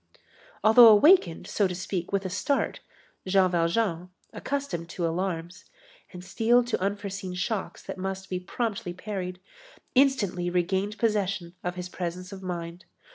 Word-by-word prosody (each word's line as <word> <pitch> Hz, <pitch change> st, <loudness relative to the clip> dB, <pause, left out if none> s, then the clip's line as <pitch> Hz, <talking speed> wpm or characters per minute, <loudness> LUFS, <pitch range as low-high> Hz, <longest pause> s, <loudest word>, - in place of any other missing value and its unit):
Although 225 Hz, +2 st, +9 dB
awakened, 215 Hz, -, +6 dB
so 205 Hz, -, +1 dB
to 180 Hz, -, -5 dB
speak, 180 Hz, -1 st, -4 dB
with 200 Hz, -1 st, 0 dB
a -, -, -2 dB
start, 275 Hz, +10 st, -1 dB, 0.5 s
Jean 185 Hz, -1 st, +3 dB
Valjean, 175 Hz, +1 st, 0 dB, 0.2 s
accustomed 255 Hz, -13 st, -4 dB
to 175 Hz, 0 st, -3 dB
alarms, 170 Hz, 0 st, -3 dB, 0.5 s
and 180 Hz, 0 st, -10 dB
steeled 240 Hz, +4 st, +3 dB
to 225 Hz, -, -1 dB
unforeseen 195 Hz, -2 st, -3 dB
shocks 195 Hz, +3 st, -3 dB
that -, -, -7 dB
must 190 Hz, 0 st, -4 dB
be 185 Hz, -1 st, -3 dB
promptly 195 Hz, -1 st, -3 dB
parried, 185 Hz, -1 st, -5 dB, 0.5 s
instantly 220 Hz, -10 st, +2 dB
regained 190 Hz, +4 st, -1 dB
possession 195 Hz, -6 st, -1 dB
of 180 Hz, 0 st, -3 dB
his 180 Hz, 0 st, -5 dB
presence 180 Hz, 0 st, -5 dB
of 195 Hz, -1 st, -8 dB
mind. 175 Hz, -1 st, -6 dB
185 Hz, 140 wpm, -27 LUFS, 180-210 Hz, 0.5 s, Although